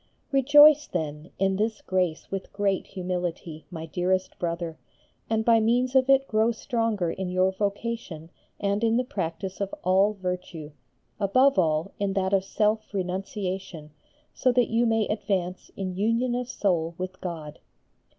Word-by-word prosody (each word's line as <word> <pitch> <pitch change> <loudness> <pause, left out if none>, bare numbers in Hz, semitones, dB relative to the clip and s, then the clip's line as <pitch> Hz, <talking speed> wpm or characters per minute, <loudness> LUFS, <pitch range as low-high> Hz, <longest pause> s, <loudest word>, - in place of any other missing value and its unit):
Rejoice, 290 +2 +7
then, 155 -2 -4
in 195 0 +1
this 215 +1 -1
grace 180 -4 -1
with 195 -1 -5
great 200 -2 0
humility, 180 -4 -4
my 165 -3 -6
dearest 185 +3 -1
brother, 170 -2 -3 0.5
and 220 0 0
by 230 -1 +5
means 245 +3 +2
of 265 0 +3
it 270 0 +5
grow 220 +2 +2
stronger 225 -7 -1
in 190 -1 -4
your 185 +1 +2
vocation 200 -5 -4 0.3
and 200 +2 0
in 230 0 +3
the 250 - +2
practice 190 -5 -4
of 200 -1 -2
all 190 +3 +3
virtue, 180 -5 -5 0.5
above 235 +4 +4
all 160 +1 +1
in 200 -1 0
that 190 0 0
of 195 -1 +3
self 215 +2 0
renunciation, 185 -3 -4 0.4
so 255 - +2
that 245 -2 +2
you 235 +1 +3
may 225 -2 +2
advance 190 -4 -2
in 185 -2 -3
union 230 +5 +1
of 245 0 -3
soul 170 -8 0
with 185 0 -6
God. 160 -4 -6
195 Hz, 150 wpm, -26 LUFS, 180-225 Hz, 0.5 s, Rejoice